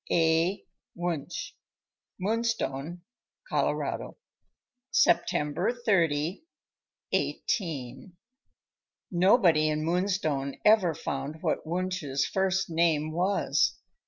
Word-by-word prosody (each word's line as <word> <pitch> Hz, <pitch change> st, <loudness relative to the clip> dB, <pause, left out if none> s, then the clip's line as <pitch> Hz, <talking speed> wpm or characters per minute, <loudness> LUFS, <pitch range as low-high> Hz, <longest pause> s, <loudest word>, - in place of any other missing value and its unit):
— -, -, -11 dB
A. 165 Hz, +3 st, +2 dB, 0.3 s
Wunsch. 170 Hz, -4 st, -3 dB, 0.7 s
Moonstone, 185 Hz, -7 st, -2 dB, 0.4 s
Colo. -, -, -1 dB, 0.7 s
September 175 Hz, -, +2 dB
30, 170 Hz, -, +1 dB, 0.7 s
18— 145 Hz, -, -2 dB, 1.0 s
Nobody 175 Hz, -4 st, +4 dB
in 155 Hz, 0 st, -1 dB
Moonstone 165 Hz, -6 st, 0 dB
ever 205 Hz, -7 st, +5 dB
found 140 Hz, +4 st, -5 dB
what -, -, -1 dB
Wunsch's 170 Hz, -6 st, -1 dB
first 190 Hz, 0 st, 0 dB
name 160 Hz, -2 st, +2 dB
was. 185 Hz, +5 st, +1 dB
170 Hz, 75 wpm, -28 LUFS, 150-190 Hz, 1.0 s, ever